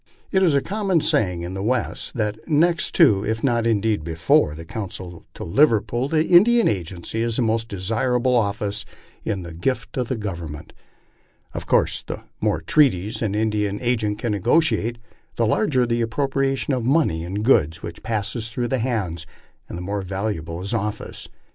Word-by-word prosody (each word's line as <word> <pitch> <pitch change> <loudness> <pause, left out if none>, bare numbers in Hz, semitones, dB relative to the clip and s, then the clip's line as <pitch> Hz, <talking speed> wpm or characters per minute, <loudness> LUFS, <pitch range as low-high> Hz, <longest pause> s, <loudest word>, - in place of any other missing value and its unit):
It 190 - +3
is 170 -6 +4
a 140 - +2
common 195 -4 +1
saying 90 -10 +1
in 90 +2 -5
the 95 - -4
West 120 +4 -2
that 105 -2 -1
next 170 +3 +2
to, 110 - +5
if 110 +1 -2
not 120 -4 +2
indeed 110 -5 +1
before, 80 -2 +2
the 80 +1 -9
consulship 90 -3 -7
to - - -7
Liverpool, 120 - +2
an 155 +1 +3
Indian 220 +7 +5
agency 95 +2 -3
is 115 -1 0
the 125 - +1
most 115 0 0
desirable 120 +6 0
office 105 -2 0 0.4
in 100 -4 -2
the 85 -1 -8
gift 115 +8 -2
of 125 -2 0
the 130 - -1
Government. 85 -8 -6 0.8
Of - - -6
course - - +2
the - - -7 0.2
more - - 0
treaties 110 -7 +2
an 105 -3 -1
Indian 105 -2 0
agent 110 -4 0
can 115 0 -2
negotiate, 115 - +2 0.4
the 115 - +1
larger 130 - +2
the 120 0 0
ap 115 - 0
propriation 135 +2 0
of 125 - -2
money 125 - +2
and 100 +5 -3
goods 85 - +3
which 85 - -7
passes 110 +1 -2
through 120 +1 -2
his 130 -3 +1
hands, 95 -10 -2 0.4
and - - -6
the 90 - -5
more 100 +2 -2
valuable 95 -3 -4
his 100 +5 -3
office. 105 -1 -4
110 Hz, 175 wpm, -22 LUFS, 95-125 Hz, 0.8 s, to